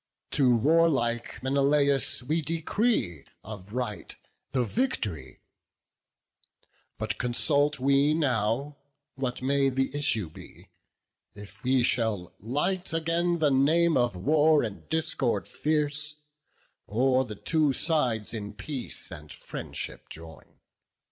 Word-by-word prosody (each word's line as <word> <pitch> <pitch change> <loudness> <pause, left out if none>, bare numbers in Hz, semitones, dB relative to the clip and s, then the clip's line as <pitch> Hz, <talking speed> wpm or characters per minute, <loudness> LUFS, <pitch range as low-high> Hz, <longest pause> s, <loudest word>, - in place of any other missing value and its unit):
To 130 -4 +4
warlike 130 -5 +1
Menelaus 140 0 +2
we 155 +6 0
decree, 160 - -1 0.2
Of 100 -1 -9
right, 120 -3 -4 0.4
the 130 -2 +1
vict'ry; 105 - -2 1.6
but 110 -2 -3
consult 140 +4 +2
we 140 +3 +3
now 135 0 0 0.4
What 130 -2 -4
may 135 +1 +2
the 135 +1 -1
issue 115 - +1
be; - - -14 0.7
if 105 +2 -12
we 130 0 +3
shall 110 -6 0
light 165 - -1
Again 165 +2 +1
the 155 -3 +2
name 160 +5 +3
of 120 -5 +2
war 150 - +3
and 105 -4 -6
discord 135 -10 0
fierce, 150 0 -1 0.7
Or 130 +4 +2
the 110 -4 -7
two 155 +6 +1
sides 125 -8 0
in 105 -2 -5
peace 140 -5 -5
and - - -10
friendship - - -6
join. 80 0 -12
135 Hz, 110 wpm, -27 LUFS, 115-150 Hz, 1.6 s, To